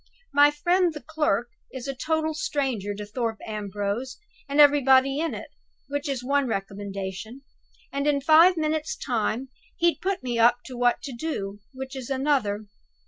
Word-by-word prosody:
My 290 +1 +7
friend 345 +3 +1
the - - -5
clerk 250 -7 0 0.2
is 260 0 -7
a 275 - -2
total 315 +3 -1
stranger 265 -9 -2
to 210 +1 -6
Thorpe 225 +1 -3
Ambrose 210 +4 -3 0.3
and 285 +2 0
everybody 275 -1 +6
in 330 0 -1
it - - -8 0.4
(which 285 0 -3
is 265 -3 -2
one 280 +1 +1
recommendation); 200 +3 -5 0.5
and 280 +1 -1
in 290 -1 +3
five 325 +5 +6
minutes' 310 0 -1
time 245 +1 -1 0.3
he'd 340 0 +2
put 385 -6 -1
me 240 -2 -2
up 240 +1 +4
to 255 - -8
what 245 0 +2
to 275 - -6
do 205 -8 -4
(which 265 0 -7
is 260 -3 -6
another). 260 -7 0
265 Hz, 160 wpm, -25 LUFS, 225-295 Hz, 0.5 s, My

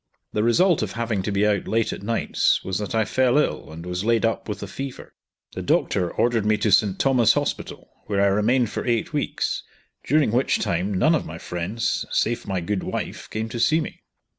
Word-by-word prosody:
The 105 - +1
result 170 - +3
of 105 -3 -3
having 115 -4 -1
to 100 - -3
be 100 +1 +2
out 105 -2 +1
late 110 +2 +1
at - - -7
nights, 115 +3 +1
was 95 0 -2
that 105 +1 -4
I 110 -1 +2
fell 130 +3 +2
ill, 150 - 0
and 80 +2 -9
was 90 +1 -3
laid 115 0 +2
up 115 0 -2
with 105 - -4
a - - -5
fever. 135 +7 -7 0.4
The - - -5
doctor 90 -2 +1
ordered 120 -2 +1
me 105 0 +2
to 105 0 0
St. 100 0 +4
Thomas' 125 -5 +4
Hospital, - - -3 0.2
where 100 -2 0
I 100 - +4
remained 105 +4 +2
for - - -3
eight 120 +3 -1
weeks, 145 - -1 0.4
during 145 -4 +2
which 125 +4 +2
time 90 +4 -1
none 105 - +3
of 160 - 0
my 80 - -7
friends, 90 +7 -2
save 120 +1 0
my 95 -2 -1
good 95 +3 -2
wife, - - -5
came 110 +1 -3
to 120 - -5
see 155 +7 +3
me. 155 - -6
110 Hz, 215 wpm, -23 LUFS, 100-120 Hz, 0.4 s, St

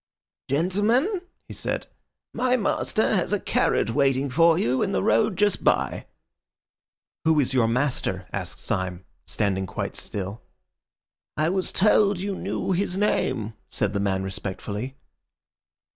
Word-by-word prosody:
"Gentlemen," 210 - +2 0.3
he - - -8
said, - - -2 0.5
"my 255 +1 +2
master 220 0 +1
has 190 -2 +1
a 205 - +2
carriage 115 - +1
waiting 135 +1 +1
for 165 +3 +5
you 130 -5 +1
in - - 0
the 95 - +1
road 115 - +3
just 205 0 +2
by." - - +1 1.2
"Who 160 -1 +4
is 135 -1 +1
your 125 -3 +3
master?" 115 -7 -1
asked - - -4
Syme, 95 0 -3 0.2
standing 95 -2 -1
quite - - -4
still. 100 +2 -5 1.0
"I 155 +2 +2
was 190 0 0
told 205 -1 +3
you 195 +1 -2
knew - - -3
his 185 0 0
name," 130 - 0
said 105 -1 -1
the 100 - 0
man 95 -1 0
respectfully. 100 +6 -4
140 Hz, 135 wpm, -25 LUFS, -, 1.2 s, for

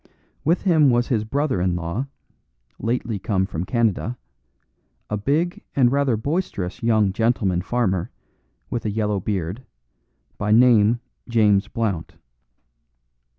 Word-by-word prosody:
With 165 +5 +1
him 160 -7 +4
was 120 0 +2
his 115 -5 +1
brother 135 -4 0
in 90 -1 +1
law, 85 +10 -3 0.7
lately 115 -2 -2
come 95 -2 0
from 85 -1 -4
Canada, 115 0 0 0.9
a - - +1
big 150 - 0
and 125 -3 +4
rather 140 -4 +2
boisterous 110 - -3
young 110 -4 +2
gentleman 105 -5 +1
farmer, 95 -4 -1 0.6
with 120 - -2
a 110 - -1
yellow 105 -1 0
beard, 95 +3 -3 0.8
by 105 0 0
name 115 -1 +5 0.3
James 105 -3 +3
Blount. 105 -8 -3
110 Hz, 120 wpm, -22 LUFS, 100-125 Hz, 0.9 s, name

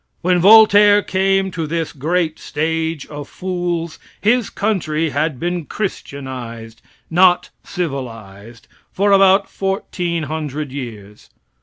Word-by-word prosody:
When 180 0 +2
Voltaire 205 +1 +7
came 195 0 +1
to 165 -3 -4
this 165 0 -3
"great 160 +3 -1
stage 160 0 -2
of 145 -1 -9
fools," 175 -3 -3 0.2
his 230 +2 +2
country 165 -7 -1
had 145 -1 -1
been 175 -1 -2
christianized 125 - -6 0.3
not 180 +1 +4
civilized 115 - -6 0.2
for 200 +1 +1
about 195 0 +5
fourteen 180 -3 -3
hundred 150 -2 -4
years. 110 -7 -9
165 Hz, 110 wpm, -18 LUFS, 140-190 Hz, 0.3 s, Voltaire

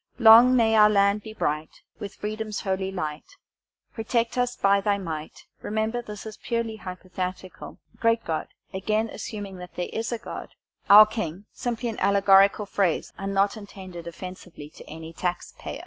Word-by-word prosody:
Long 235 +2 +8
may 225 -2 +3
our 210 -1 +7
land 200 0 +3
be 220 - -9
bright, 155 -7 -3 0.2
With 200 -1 -7
freedom's 215 0 -4
holy 190 -1 -2
light; 180 - -5 0.6
Protect 230 +1 -1
us 245 0 0
by 200 0 +3
Thy 200 0 +1
might 160 -5 -7 0.2
remember, 220 +3 -2
this 210 -3 -9
is 215 -1 -8
purely 230 -2 -3
hypothetical 185 -1 -7 0.2
Great 230 0 +2
God 160 -1 -2 0.3
again 215 +4 0
assuming 205 -2 -7
that 180 0 -11
there 180 - -3
is 225 +2 -3
a 235 - -1
God 225 - -9 0.3
our 210 +2 +11
king 200 -3 -5
simply 240 0 -3
an 225 - -4
allegorical 200 +1 +4
phrase 195 -4 -1
and 195 0 -3
not 200 +2 +2
intended 190 -5 -10
offensively 175 -3 -9
to - - -13
any 160 +1 -9
taxpayer." 175 +1 -4
200 Hz, 160 wpm, -25 LUFS, 185-220 Hz, 0.6 s, our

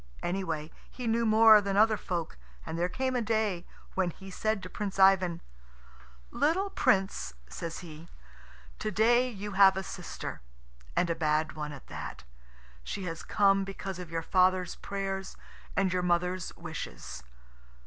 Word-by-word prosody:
Anyway, 165 -4 -2 0.2
he 250 - -7
knew 230 0 +2
more 220 -1 +8
than 200 -1 -1
other 215 +1 +5
folk, 175 - -4 0.3
and - - -4
there 175 +2 0
came 260 +7 -1
a 245 - +1
day 215 -5 0 0.3
when 190 -2 +1
he 190 +3 -10
said 215 +1 -1
to - - -5
Prince 200 -2 -4
Ivan, 190 -3 +5 0.9
"Little 365 +7 +1
Prince," 190 - +1
says 165 - -6
he, 160 -1 -11 0.7
"to 215 - -1
day 240 +5 +4
you 210 -2 -6
have 195 -1 +6
a 190 - -2
sister, 180 - -6 0.5
and 170 - +2
a - - 0
bad 155 -1 +1
one 150 -1 -5
at 140 -3 -10
that. 70 -4 -7 0.6
She 195 - -4
has 165 -2 -4
come 195 -2 +3
because 195 -1 -6
of 180 -3 -7
your 165 0 -3
father's 185 0 +3
prayers 195 -1 -4 0.4
and 195 -2 +2
your 180 - +1
mother's 180 +1 0
wishes. 60 +1 -7
190 Hz, 155 wpm, -30 LUFS, 170-210 Hz, 0.9 s, more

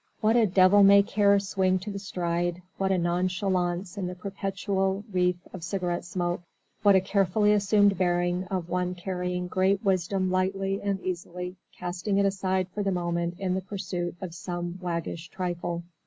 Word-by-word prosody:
What 220 +2 +3
a 230 -3 +5
devil 185 +2 +6
may 200 0 +8
care 200 -1 +3
swing 190 -1 +1
to 200 +3 -6
the 200 - -5
stride, 175 -2 -2 0.2
what 195 0 +1
a 190 - +3
nonchalance 180 +1 -1
in 185 - -2
the 180 - -5
perpetual 195 +1 -2
wreath 180 0 +1
of 185 -3 -7
cigarette 175 -1 -2
smoke, 175 -1 -2 0.4
what 200 -2 +6
a 190 - +5
carefully 200 +2 +2
assumed 205 -1 +3
bearing 175 0 +1
of 185 -2 -3
one 180 +1 -1
carrying 180 0 -3
great 190 +3 +1
wisdom 185 0 +1
lightly 195 +1 0
and 200 -1 -1
easily 180 0 -5 0.2
casting 180 +3 -2
it 200 - +3
aside 190 -1 0
for 210 - -2
the 200 - 0
moment 170 -1 -1
in 190 -2 -1
the 190 - -1
pursuit 180 -3 -4
of 180 -3 -5
some 175 +1 -5
waggish 170 -1 -4
trifle. 175 -2 -3
185 Hz, 170 wpm, -27 LUFS, 175-195 Hz, 0.4 s, may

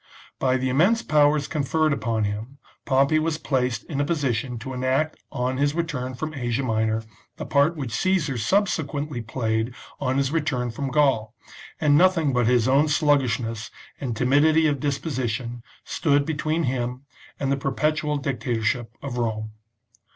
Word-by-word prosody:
By 130 -1 +2
the 130 0 -1
immense 180 - +3
powers 150 -1 +3
conferred 155 +1 +1
upon 115 -3 -1
him 105 +6 -4 0.3
Pompey 140 +3 +3
was 155 0 -1
placed 125 -6 -1
in 145 -3 -3
a - - +3
position 135 -6 -1
to 130 +4 -6
enact 130 +5 0
on 130 -1 -1
his 145 +2 +1
return 140 -7 -2
from 155 +4 -4
Asia 125 -1 -1
Minor 110 -2 0 0.3
the - - -5
part 145 +4 +3
which 135 -7 -5
Caesar 155 -1 +1
subsequently 145 - 0
played 115 0 -2 0.2
on 130 0 0
his 135 0 +1
return 145 -7 -1
from 135 +4 -3
Gaul, 130 -6 +2 0.4
and 145 -2 +4
nothing 170 -6 +3
but 125 -2 +2
his 120 -1 +3
own 140 +4 +4
sluggishness 125 -7 +1 0.3
and 120 -5 -3
timidity 150 +6 +4
of 145 -3 +1
disposition 125 -4 -2 0.2
stood 145 -3 +1
between 155 +1 -1
him 125 -1 -2 0.4
and 135 -1 0
the - - +3
perpetual 150 +2 0
dictatorship 120 -3 -2
of 130 -3 -4
Rome. 110 -2 -2
135 Hz, 150 wpm, -24 LUFS, 120-150 Hz, 0.4 s, and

